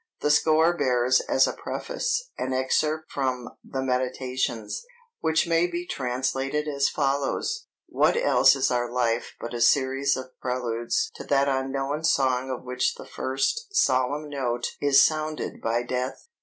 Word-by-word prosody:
The 150 - +2
score 160 +3 +4
bears 125 -3 +2
as 135 - +5
a - - -2
preface - - -3
an 130 - -3
excerpt 155 +4 0
from 130 -3 -2
the 135 - -4
Méditations, 125 -3 -2 0.4
which 160 0 +2
may 165 +1 +3
be 175 0 -4
translated 135 +2 -2
as 140 -2 +1
follows: 145 - -1 0.2
"What - - +2
else 485 - +5
is 135 -1 +1
our 120 -1 0
life 120 -2 -1
but 120 - -6
a 120 - -3
series 135 +2 +3
of 130 0 -8
preludes 120 -2 -1
to - - -9
that 140 0 +2
unknown 135 +2 -1
song 130 -4 +2
of 130 - -4
which 125 0 -1
the - - -10
first 405 - -2
solemn 135 - +2
note 125 -4 -2
is 140 -1 +5
sounded 155 0 0
by 115 +1 0
death? 125 +1 -4
135 Hz, 150 wpm, -26 LUFS, 125-150 Hz, 0.4 s, as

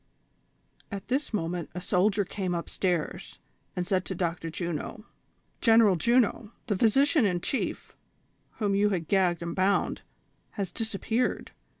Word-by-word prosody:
At 200 +1 -6
this 270 +4 0
moment 175 -4 -2
a - - -2
soldier 200 +3 +2
came 185 -2 -3
up 170 - -4
stairs, 175 -5 -2 0.4
and 180 - -1
said 185 -1 +1
to 190 - -4
Dr. 170 -1 -2
Juno: 170 +5 -4 0.6
"General 225 -4 +6
Juno, 235 +2 +2
the 205 - 0
physician 270 - +4
in 180 -4 +2
chief, 265 - -3 0.6
whom 205 -3 0
you 205 +1 +3
had 175 -6 -2
gagged 180 -4 +2
and 170 0 -4
bound, 195 +1 +1 0.5
has 200 -4 -3
disapi^eared. 225 +2 -1
195 Hz, 135 wpm, -28 LUFS, 175-220 Hz, 0.6 s, General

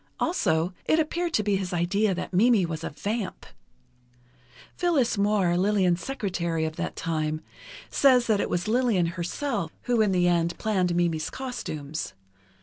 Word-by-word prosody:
Also, 175 - +1
it 315 - +3
appeared 340 +2 -1
to 215 - +2
be 205 -1 +1
his 190 -2 -4
idea 185 +4 +1
that 180 - -5
Mimi 215 0 +4
was 160 -1 -5
a - - -2
vamp. 205 +6 -4 1.3
Phyllis 310 -10 +2
Moir, 200 -4 +2
Lillian's 185 -2 +2
secretary 175 -10 -2
of 160 0 -4
that - - -3
time, 155 -1 -2 0.5
says 255 -3 +5
that 215 -3 +2
it - - -2
was 175 +2 -1
Lillian 230 -6 +2
herself 185 - -3
who, 240 -2 +2
in 210 -2 +3
the 180 -1 +3
end, 170 -1 +1
planned 185 -5 0
Mimi's 170 -3 0
costumes. 155 - -5
190 Hz, 150 wpm, -26 LUFS, 170-230 Hz, 1.3 s, says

